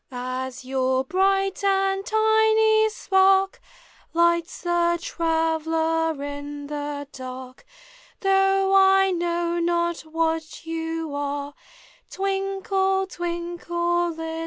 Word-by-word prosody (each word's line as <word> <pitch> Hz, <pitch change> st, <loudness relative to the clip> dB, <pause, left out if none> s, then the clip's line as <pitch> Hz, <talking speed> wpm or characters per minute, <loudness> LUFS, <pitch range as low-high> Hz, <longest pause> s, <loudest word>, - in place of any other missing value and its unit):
As 255 Hz, +1 st, -5 dB
your 260 Hz, 0 st, 0 dB
bright 390 Hz, +5 st, +1 dB
and 390 Hz, 0 st, +1 dB
tiny 440 Hz, 0 st, +3 dB
spark 385 Hz, -2 st, +2 dB, 0.6 s
Lights 340 Hz, 0 st, +1 dB
the 345 Hz, -1 st, +2 dB
traveller 325 Hz, -2 st, 0 dB
in 285 Hz, 0 st, -6 dB
the 290 Hz, -1 st, -5 dB
dark, 255 Hz, 0 st, -9 dB, 0.6 s
Though 390 Hz, 0 st, +3 dB
1 385 Hz, -1 st, +4 dB
know 345 Hz, 0 st, -1 dB
not 340 Hz, 0 st, 0 dB
what 320 Hz, 0 st, -3 dB
you 325 Hz, -1 st, -4 dB
are, 285 Hz, 0 st, -3 dB, 0.6 s
Twinkle, 385 Hz, 0 st, -1 dB
twinkle, 345 Hz, -1 st, -2 dB
little 330 Hz, -, -6 dB
star! 325 Hz, 0 st, -5 dB
340 Hz, 95 wpm, -24 LUFS, 315-385 Hz, 0.6 s, 1